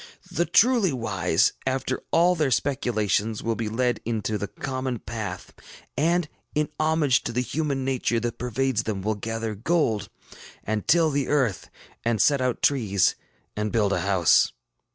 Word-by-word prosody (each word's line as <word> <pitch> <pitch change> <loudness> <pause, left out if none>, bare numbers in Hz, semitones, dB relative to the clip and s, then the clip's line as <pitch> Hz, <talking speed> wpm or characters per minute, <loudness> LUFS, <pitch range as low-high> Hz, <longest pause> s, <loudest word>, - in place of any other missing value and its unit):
The 170 +2 0
truly 225 +1 +4
wise, 125 -4 +1
after 130 0 -2
all 175 +2 +4
their 155 -5 +1
speculations, 110 -5 0
will 115 - 0
be 110 -1 -3
led 120 +1 0
into 110 -2 -2
the 105 0 -3
common 130 -2 -4
path, 105 -5 -6 0.4
and, 170 +4 +1 0.3
in 150 0 +1
homage 155 -4 +2
to - - -2
the 125 +2 0
human 140 -1 -2
nature 125 -3 0
that 120 0 -3
pervades 125 0 0
them, 105 -4 -4
will 110 +2 +1
gather 115 +1 -4
gold, 115 - 0 0.5
and 110 0 -3
till 165 -1 +4
the 140 -2 0
earth, 130 -10 0 0.3
and 115 -2 0
set 140 +5 +4
out 125 -1 -1
trees, 105 -9 +2 0.4
and 105 0 -2
build 105 -4 +2
a 90 - 0
house. 95 -3 +3
120 Hz, 155 wpm, -25 LUFS, 110-145 Hz, 0.5 s, truly